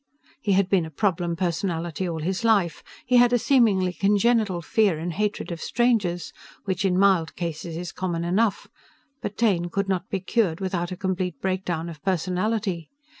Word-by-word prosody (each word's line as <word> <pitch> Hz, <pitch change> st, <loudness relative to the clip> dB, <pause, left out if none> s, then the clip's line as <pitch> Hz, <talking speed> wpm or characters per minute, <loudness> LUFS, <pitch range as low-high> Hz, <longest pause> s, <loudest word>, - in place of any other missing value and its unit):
He 205 Hz, -6 st, +1 dB
had 195 Hz, 0 st, +3 dB
been 190 Hz, -3 st, +2 dB
a -, -, -9 dB
problem 175 Hz, 0 st, 0 dB
personality 175 Hz, 0 st, -2 dB
all 160 Hz, -2 st, -4 dB
his 185 Hz, +6 st, -2 dB
life. 205 Hz, -7 st, +2 dB, 0.2 s
He 250 Hz, 0 st, +4 dB
had 245 Hz, 0 st, +6 dB
a -, -, +5 dB
seemingly 215 Hz, -8 st, +3 dB
congenital 205 Hz, -2 st, +2 dB
fear 205 Hz, -3 st, +2 dB
and 170 Hz, +2 st, -4 dB
hatred 210 Hz, 0 st, -2 dB
of 170 Hz, -1 st, -5 dB
strangers 215 Hz, -8 st, 0 dB, 0.3 s
which 190 Hz, -1 st, -1 dB
in 185 Hz, -2 st, +2 dB
mild 190 Hz, -4 st, +3 dB
cases 165 Hz, -1 st, -4 dB
is 175 Hz, 0 st, -5 dB
common 175 Hz, -2 st, -3 dB
enough, 200 Hz, +5 st, +1 dB, 0.5 s
but 205 Hz, -, -5 dB
Taine 185 Hz, -7 st, +2 dB
could 200 Hz, +3 st, -1 dB
not 190 Hz, -2 st, -2 dB
be 195 Hz, -, -1 dB
cured 185 Hz, -3 st, 0 dB
without 185 Hz, -2 st, -2 dB
a 185 Hz, -, -5 dB
complete 185 Hz, -5 st, -2 dB
breakdown 185 Hz, -3 st, -2 dB
of 160 Hz, -3 st, -9 dB
personality. 185 Hz, 0 st, -1 dB
185 Hz, 175 wpm, -25 LUFS, 170-205 Hz, 0.5 s, had